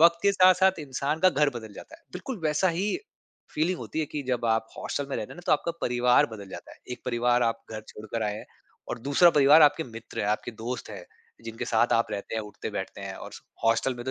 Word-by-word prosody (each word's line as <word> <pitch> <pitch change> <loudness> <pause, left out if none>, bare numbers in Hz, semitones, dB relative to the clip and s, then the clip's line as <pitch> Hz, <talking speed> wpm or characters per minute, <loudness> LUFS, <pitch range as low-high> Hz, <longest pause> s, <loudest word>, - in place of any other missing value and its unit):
वक़्त 170 +1 +6
के 200 - +4
साथ-साथ 185 0 +5
इंसान 145 +2 -2
का - - +7
घर 150 -2 +2
बदल 110 -2 -11
जाता 325 - -11
है, 335 - -28
बिल्कुल 255 -7 -6
वैसा 155 +4 +2
ही 200 +3 0 0.7
फीलिंग 170 +4 0
होती 160 - -4
है 155 - -1
कि 150 - -3
जब 120 -2 0
आप 110 0 -1
हॉस्टल 140 - -3
में - - -1
रहते 105 - -5
ना 175 - -10
तो - - +4
आपका 160 +3 +1
परिवार 125 0 +3
बदल 100 -2 -10
जाता - - -9
है। - - -16
1 - - -8
परिवार 120 0 +2
आप 115 - -25
घर 110 -1 -5
छोड़कर 110 +1 -5
आए 105 -1 -1
हैं - - -9 0.4
और 120 - -4
दूसरा 170 +5 +6
परिवार 150 +1 +7
आपके 150 +2 +4
मित्र 115 -1 -7
है, 105 - -1
आपके 105 +3 -1
दोस्त 115 +1 -6
हैं, 95 -4 -8 0.4
जिनके 115 0 -5
साथ 115 +1 +2
आप 115 - +3
रहते 100 - -5
हैं, 110 - -1
उठते-बैठते 105 -1 -6
हैं - - -6
और - - -9
स - - -11 0.2
हॉस्टल 115 +3 +2
में 120 0 -8
तो 130 - -2
125 Hz, 240 wpm, -27 LUFS, 115-155 Hz, 0.7 s, का